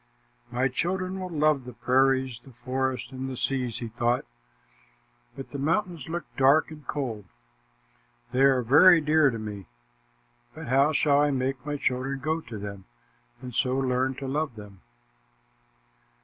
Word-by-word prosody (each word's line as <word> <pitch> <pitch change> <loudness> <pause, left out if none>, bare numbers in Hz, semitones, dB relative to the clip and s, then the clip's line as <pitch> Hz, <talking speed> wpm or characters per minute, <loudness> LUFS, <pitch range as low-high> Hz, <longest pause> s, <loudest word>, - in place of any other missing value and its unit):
"My 125 +2 +1
children 185 +7 -2
will 185 -1 -5
love 155 -4 +2
the 125 0 -9
prairies, 130 0 +1
the 135 - -15
forests, 130 0 -3
and 130 0 -5
the 130 - -6
seas," 125 -1 -1
he 120 - -5
thought, 120 +2 0 1.1
"but 135 - -8
the 140 - -5
mountains 165 0 -1
look 170 +1 -3
dark 140 +4 +4
and 150 -2 -12
cold. 120 -8 -3 1.1
They 125 +2 +1
are 135 -2 +4
very 165 +9 +7
dear 155 -1 +4
to 115 - -4
me, 105 -4 -7 0.9
but - - -8
how 135 +4 +4
shall 145 -1 +3
I 145 - +3
make 130 -1 -2
my 145 0 -2
children 135 +1 -1
go 160 +3 -1
to 115 -6 -8
them 100 -1 -7 0.6
and 125 -1 -7
so 130 +2 +1
learn 130 0 0
to 135 +1 -6
love 145 -1 -2
them?" 105 -3 -12
130 Hz, 155 wpm, -27 LUFS, 125-150 Hz, 1.1 s, very